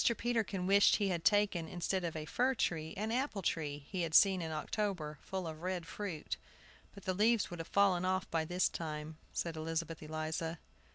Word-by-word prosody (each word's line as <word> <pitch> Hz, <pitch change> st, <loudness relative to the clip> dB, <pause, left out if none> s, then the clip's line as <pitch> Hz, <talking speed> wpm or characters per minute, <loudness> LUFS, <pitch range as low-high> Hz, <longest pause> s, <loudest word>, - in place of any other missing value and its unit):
Peterkin 225 Hz, -6 st, 0 dB
wished 200 Hz, +2 st, +6 dB
he 205 Hz, -2 st, +1 dB
had 170 Hz, -3 st, -1 dB
taken, 205 Hz, -6 st, +3 dB
instead 180 Hz, +2 st, -1 dB
of 165 Hz, -2 st, -2 dB
a 155 Hz, -1 st, -4 dB
fir 255 Hz, +9 st, +1 dB
tree, 160 Hz, -7 st, -1 dB
an 215 Hz, +2 st, -1 dB
apple 245 Hz, -5 st, -1 dB
tree 145 Hz, -4 st, -2 dB
he 185 Hz, -3 st, -2 dB
had 165 Hz, -1 st, -1 dB
seen 195 Hz, -3 st, +7 dB
in 160 Hz, -1 st, -3 dB
October, 155 Hz, -2 st, -2 dB
full 190 Hz, -2 st, -4 dB
of 160 Hz, -1 st, -6 dB
red 180 Hz, -1 st, -2 dB
fruit. 185 Hz, -3 st, -4 dB, 0.6 s
"But 200 Hz, -, -11 dB
the 185 Hz, -, +1 dB
leaves 215 Hz, +1 st, +3 dB
would 175 Hz, -, -6 dB
have 165 Hz, -, -5 dB
fallen 195 Hz, -3 st, +3 dB
off 185 Hz, 0 st, 0 dB
by 165 Hz, -1 st, +1 dB
this 180 Hz, +2 st, +2 dB
time," 155 Hz, -1 st, -5 dB
said 170 Hz, -1 st, -2 dB
Elizabeth 165 Hz, +1 st, -3 dB
Eliza. 155 Hz, +2 st, -3 dB
175 Hz, 190 wpm, -35 LUFS, 160-200 Hz, 0.6 s, seen